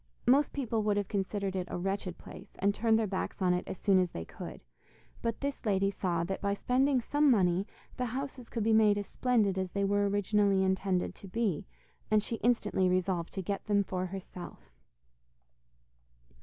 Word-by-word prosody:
Most 275 +4 +4
people 235 -5 -1
would 210 -1 +1
have 205 -2 0
considered 200 -1 -2
it 180 -1 -2
a - - -3
wretched 190 0 -3
place, - - -12
and 200 +1 +2
turned 225 +1 +3
their 225 - +1
backs 190 -2 -3
on 180 -2 +3
it 180 - 0
as - - -5
soon 195 0 +3
as 180 -1 +1
they 80 - -6
could, - - -9 0.6
but 230 -1 -2
this 280 0 -3
lady 195 -3 +2
saw 175 -4 -1
that 190 +3 -3
by 200 0 0
spending 260 +4 +2
some 290 +4 +2
money 190 -4 +3 0.3
the 250 -1 -1
houses 260 0 -5
could 230 - -2
be 225 +1 +3
made 215 -2 +5
as 205 - -2
splendid 210 -5 +1
as 185 -1 -2
they 200 - 0
were 200 0 +2
originally 200 -1 +2
intended 190 -1 0
to 195 - -12
be, 200 - -1 0.4
and 215 -1 +3
she 230 - -3
instantly 210 -6 +2
resolved 180 -2 0
to 190 - -4
get 200 +3 -3
them 205 -1 +3
for 185 -1 -3
herself. 180 - -9
200 Hz, 190 wpm, -31 LUFS, 185-225 Hz, 0.6 s, made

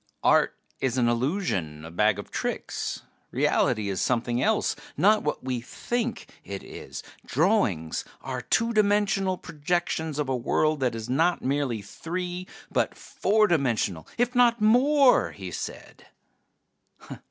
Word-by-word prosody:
"Art - - +4 0.2
is 130 -1 0
an 120 -2 +3
illusion, 115 - -1
a 80 - -9
bag 105 +3 +2
of 100 - -8
tricks. - - -3 0.3
Reality 105 -2 +1
is 95 -2 -2
something 120 0 0
else, - - +1 0.2
not 210 +7 +5
what 150 - -2
we 125 -2 -2
think 240 - -3 0.2
it 100 -1 -6
is. - - -8 0.2
Drawings 130 - +1 0.2
are 130 -1 -4
two 230 - +1
dimensional 200 -3 +2
projections 160 -1 -2
of 150 -2 -1
a 130 - 0
world 155 +5 +1
that 125 -3 0
is 110 0 -5
not 165 +7 +1
merely 130 -6 -1
three 180 - -5 0.2
but - - 0
four 215 +1 +2
dimensional, 120 - 0
if 245 +1 +1
not 240 -2 +4
more," 255 +5 +4
he 95 -2 -7
said. - - -7
145 Hz, 135 wpm, -26 LUFS, -, 0.3 s, not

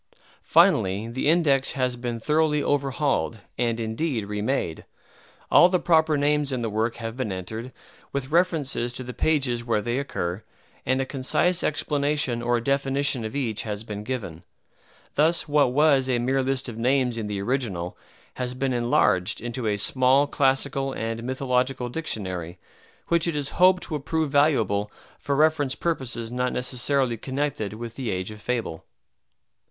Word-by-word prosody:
Finally, 95 +4 +3
the 130 +5 0
index 145 -5 +3
has 130 -2 0
been 120 -1 -4
thoroughly 150 +3 +1
overhauled 140 -5 0 0.2
and, 120 -1 0
indeed, 115 +1 -2
remade. 105 -4 -2 0.7
All 175 - +7
the 185 - +3
proper 160 -3 +3
names 145 0 +1
in 125 -2 -2
the 115 - -2
work 110 +2 0
have 115 -1 -6
been 130 -5 -3
entered, 110 +7 -6 0.4
with 140 0 -4
references 155 -8 +1
to 130 - -4
the 125 0 -7
pages 135 -7 +1
where 115 -2 +1
they 120 +4 -1
occur, 95 -8 -3 0.4
and 130 +1 +2
a 135 - 0
concise 140 +7 0
explanation 145 -4 0
or 120 0 +1
definition 140 0 0
of 110 +3 -5
each 115 -6 -1
has 105 -1 -5
been 105 -2 -6
given. 105 -9 -5 0.7
Thus 160 +4 +2
what 145 -3 +3
was 140 -1 +3
a 125 - +2
mere 130 +3 +1
list 135 0 -1
of 115 -2 -7
names 125 0 +2
in 110 -2 -3
the 105 -1 -3
original 100 -7 -2 0.4
has 125 0 -3
been 130 0 -1
enlarged 120 -5 +2
into 120 0 -4
a 105 -1 +1
small 130 +6 +3
classical 135 -1 0
and 115 +1 -3
mythological 130 0 -1
dictionary, 95 - -4 0.5
which 170 0 +2
it 170 - -1
is 145 -1 -1
hoped 185 -1 +4
will 150 - -1
prove 155 +1 -1
valuable 115 -9 +2 0.3
for 140 - -1
reference 150 -2 +2
purposes 125 -8 -2
not 125 +1 -1
necessarily 125 0 +1
connected 130 -5 -3
with 115 +1 -8
"The 130 -4 -3
Age 95 +1 -3
of 105 0 -11
Fable." 115 -10 -3
130 Hz, 160 wpm, -25 LUFS, 115-140 Hz, 0.7 s, All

